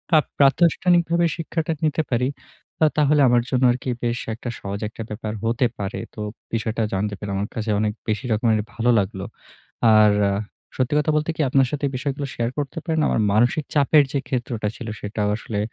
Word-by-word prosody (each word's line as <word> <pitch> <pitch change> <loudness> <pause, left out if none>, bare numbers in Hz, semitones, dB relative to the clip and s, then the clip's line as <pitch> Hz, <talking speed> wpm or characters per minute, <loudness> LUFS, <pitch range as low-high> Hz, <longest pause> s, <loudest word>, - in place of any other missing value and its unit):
আ - - +8 0.2
প্রাতিষ্ঠানিক 170 +5 +4
ভাবে 170 0 +3
শিক্ষাটা 165 0 -2
নিতে 155 +1 +1
পারি, 125 +1 +2 0.6
আ - - +8
তাহলে 150 0 +4
আমার 120 0 +4
জন্য 130 -1 +1
আরকি 125 +1 -3
বেশ 120 0 0 0.2
একটা 120 +1 -6
সহজ 100 0 -5
একটা 110 - -7
ব্যাপার 105 0 -5
হতে 115 +3 +1
পারে। 100 0 -3 0.2
তো - - -10 0.3
বিষয়টা 115 0 -1
জানতে 100 +2 -1
পেরে, 105 -1 -5
আমার 100 +2 -1
কাছে 110 -2 -2
অনেক 105 0 0 0.2
বেশি 110 +5 -1
রকমের 110 0 +2
ভালো 120 +1 0
লাগলো। 95 -1 -3 0.7
আর 105 -1 +6 0.6
সত্যি 130 +3 0
কথা 150 +1 +1
বলতে 155 +1 0
কি? - - -1
আপনার 135 0 +3
সাথে 145 -1 -4
এই - - -4
বিষয়গুলো 140 +1 -3
শেয়ার 120 0 -1
করতে 145 +3 -3
পেরে 160 -2 -1
না? - - +3
আমার 110 - +1
মানসিক 120 +8 +3
চাপের 145 +1 +5
যে 140 - +1
ক্ষেত্রটা 120 -4 -2
ছিল, 115 - -8
সেটাও 105 0 -2
আসলে 105 -2 -4
120 Hz, 190 wpm, -22 LUFS, 110-145 Hz, 0.7 s, আ